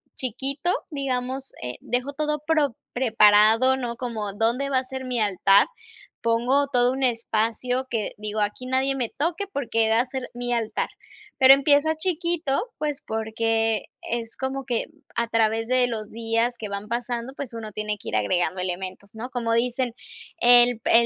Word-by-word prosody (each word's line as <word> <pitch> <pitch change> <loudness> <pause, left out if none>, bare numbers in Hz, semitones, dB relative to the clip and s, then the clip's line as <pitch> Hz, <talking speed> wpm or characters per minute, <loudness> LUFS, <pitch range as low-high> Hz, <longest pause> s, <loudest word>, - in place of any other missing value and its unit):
chiquito, 270 +7 -1 0.2
digamos, 265 -1 -3
eh, 125 0 -4
dejo 250 +3 -2
todo 300 +1 -1
pro 305 -5 +2 0.2
preparado, 225 +1 +5
¿no? 245 -3 -4
Como, 225 -5 -4
dónde 235 +6 0
va 270 - +2
a - - -5
ser 265 0 -6
mi 250 -2 -1
altar, 200 -1 +4 0.5
pongo 245 +5 +2
todo 245 -1 +3
un 265 +1 -4
espacio 235 +1 0
que 220 -3 -2
digo 215 +1 -4
aquí 210 +4 -2
nadie 265 +1 +1
me 245 -4 -1
toque, 335 +6 -2
porque 230 - 0
va 225 +1 +4
a - - -2
ser 260 -1 -6
mi 245 0 -2
altar, 230 -2 -1 0.5
pero 265 0 +9
empieza 285 +3 +3
chiquito, 340 -3 0 0.2
pues, 295 -2 -3
porque 225 0 0 0.2
es 230 -1 -4
como 265 0 -3
que 240 -3 -1 0.3
a 235 0 0
través 225 0 +1
de 255 0 +3
los 215 -3 -5
días 230 +1 0
que 215 - -5
van 200 +1 -5
pasando, 240 +2 -3
pues 270 -4 -6
uno 220 -2 -6
tiene 210 0 -3
que - - -8
ir - - -2
agregando 175 - 0
elementos, 185 +3 -5
¿no? 240 +4 -6
Como 235 -2 -2
dicen, 240 +1 0 0.4
el 245 -4 +6
pri - - -1
240 Hz, 170 wpm, -24 LUFS, 220-265 Hz, 0.5 s, pero